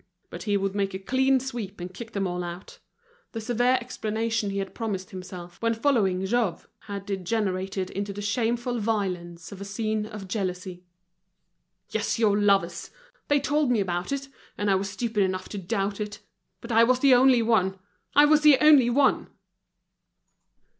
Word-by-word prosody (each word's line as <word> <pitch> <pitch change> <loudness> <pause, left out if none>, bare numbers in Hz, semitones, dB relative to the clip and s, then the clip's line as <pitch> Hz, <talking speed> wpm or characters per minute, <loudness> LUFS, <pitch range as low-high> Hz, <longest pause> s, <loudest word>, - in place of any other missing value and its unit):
But - - -7
he 205 - +3
would 195 0 -1
make 195 -1 -1
a - - -1
clean 265 +6 +2
sweep, 235 -7 -6
and 180 +1 -7
kick 225 +3 -9
them 200 -1 -1
all 180 -1 -2
out. 175 +2 -8 0.5
The 225 - -3
severe 245 +3 +2
explanation 225 -2 -2
he 195 - -3
had 195 -1 -3
promised 200 -5 -4
himself, 180 -2 -9
when 230 0 +1
following 210 -8 +1
Jouve, 220 -3 0 0.2
had 200 -1 -5
degenerated 190 -1 -2
into 200 +1 -3
the 200 - -7
shameful 240 +3 -1
violence 180 -6 -3
of 200 -1 -9
a - - -3
scene 215 +1 -2
of 210 -3 -8
jealousy. 185 -3 -4 1.1
"Yes, - - -1
your 215 -3 +3
lovers! 200 -1 +1 0.4
They 290 0 +3
told 290 0 +1
me 240 -3 +2
about 180 +2 -2
it, 275 0 -3 0.3
and 205 -1 +1
I - - +5
was 195 +1 0
stupid 220 +1 -2
enough 185 -1 -1
to 205 - -5
doubt 195 +3 -2
it. 210 0 -5 0.4
But 235 - -7
I 230 0 +6
was 250 +2 +4
the 275 -1 +5
only 250 -1 +5
one! 195 -4 +2 0.4
I 290 +1 +8
was 300 0 +4
the 300 -3 +7
only 295 -5 +6
one!" 275 +3 +2
205 Hz, 175 wpm, -26 LUFS, 190-240 Hz, 1.1 s, I